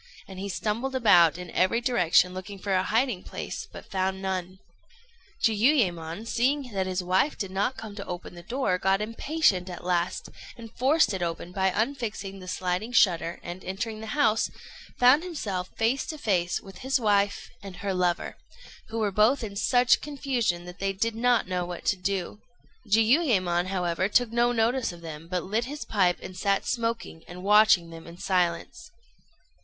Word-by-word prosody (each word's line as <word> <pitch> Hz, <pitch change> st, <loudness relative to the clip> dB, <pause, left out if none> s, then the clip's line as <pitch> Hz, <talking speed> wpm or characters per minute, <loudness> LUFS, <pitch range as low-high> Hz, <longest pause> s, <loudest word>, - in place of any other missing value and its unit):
and 190 Hz, -1 st, -9 dB
he 200 Hz, +1 st, -4 dB
stumbled 225 Hz, +7 st, -2 dB
about 175 Hz, -, +5 dB
in 180 Hz, -1 st, -8 dB
every 185 Hz, +6 st, +2 dB
direction 180 Hz, -7 st, +3 dB
looking 185 Hz, +2 st, -7 dB
for 195 Hz, +1 st, -2 dB
a 185 Hz, -, +3 dB
hiding 225 Hz, 0 st, 0 dB
place, -, -, -6 dB
but -, -, -12 dB
found 190 Hz, 0 st, -1 dB
none. 185 Hz, -1 st, -3 dB, 0.9 s
Jiuyémon, 210 Hz, -, +2 dB
seeing 255 Hz, +1 st, 0 dB
that 190 Hz, -1 st, -1 dB
his 185 Hz, 0 st, -2 dB
wife 185 Hz, +11 st, +1 dB
did 195 Hz, -3 st, -4 dB
not 205 Hz, +7 st, -1 dB
come 220 Hz, -5 st, -8 dB
to 200 Hz, -, -6 dB
open 175 Hz, 0 st, -6 dB
the 175 Hz, -, -10 dB
door, 210 Hz, -2 st, -1 dB
got 190 Hz, +1 st, +2 dB
impatient 215 Hz, -, 0 dB
at 175 Hz, -, -8 dB
last, 175 Hz, 0 st, -1 dB, 0.3 s
and 230 Hz, -2 st, -10 dB
forced 265 Hz, -3 st, +3 dB
it 190 Hz, -, -3 dB
open 170 Hz, 0 st, -3 dB
by 190 Hz, 0 st, +1 dB
unfixing 210 Hz, -3 st, -3 dB
the 185 Hz, -, -11 dB
sliding 185 Hz, +5 st, -2 dB
shutter 175 Hz, -7 st, +2 dB
and, 175 Hz, +2 st, -7 dB
entering 215 Hz, +4 st, -4 dB
the 220 Hz, +6 st, -6 dB
house, 225 Hz, -6 st, +3 dB, 0.5 s
found 255 Hz, +5 st, +6 dB
himself 205 Hz, -, -4 dB
face 235 Hz, +5 st, +1 dB
to 315 Hz, -, -5 dB
face 180 Hz, -9 st, 0 dB
with 195 Hz, -1 st, -13 dB
his 265 Hz, +1 st, 0 dB
wife 205 Hz, -3 st, +1 dB
and 195 Hz, -2 st, -9 dB
her 195 Hz, +1 st, -3 dB
lover, 180 Hz, -1 st, -1 dB, 0.5 s
who 225 Hz, -, -5 dB
were 215 Hz, -2 st, 0 dB
both 220 Hz, +7 st, +3 dB
in 205 Hz, -2 st, -5 dB
such 245 Hz, +4 st, +3 dB
confusion 255 Hz, -11 st, -1 dB
that 180 Hz, 0 st, -10 dB
they 195 Hz, 0 st, -1 dB
did 225 Hz, +4 st, -1 dB
not 240 Hz, -1 st, +2 dB
know 180 Hz, -1 st, -1 dB
what 175 Hz, 0 st, -7 dB
to -, -, +3 dB
do. 195 Hz, +1 st, -3 dB, 0.5 s
Jiuyémon, 215 Hz, -, +3 dB
however, 185 Hz, 0 st, -1 dB
took 240 Hz, +1 st, +2 dB
no 240 Hz, +1 st, +2 dB
notice 235 Hz, +1 st, +1 dB
of 175 Hz, -1 st, -12 dB
them, 160 Hz, -1 st, -8 dB
but 180 Hz, -1 st, -2 dB
lit 220 Hz, +5 st, -1 dB
his 290 Hz, -1 st, -6 dB
pipe 185 Hz, -5 st, +2 dB
and 185 Hz, -, -8 dB
sat 195 Hz, +1 st, 0 dB
smoking 230 Hz, -8 st, -3 dB
and 180 Hz, +1 st, -9 dB
watching 195 Hz, -4 st, +5 dB
them 165 Hz, 0 st, -11 dB
in 170 Hz, +1 st, -11 dB
silence. 180 Hz, -, -1 dB
200 Hz, 180 wpm, -27 LUFS, 180-230 Hz, 0.9 s, found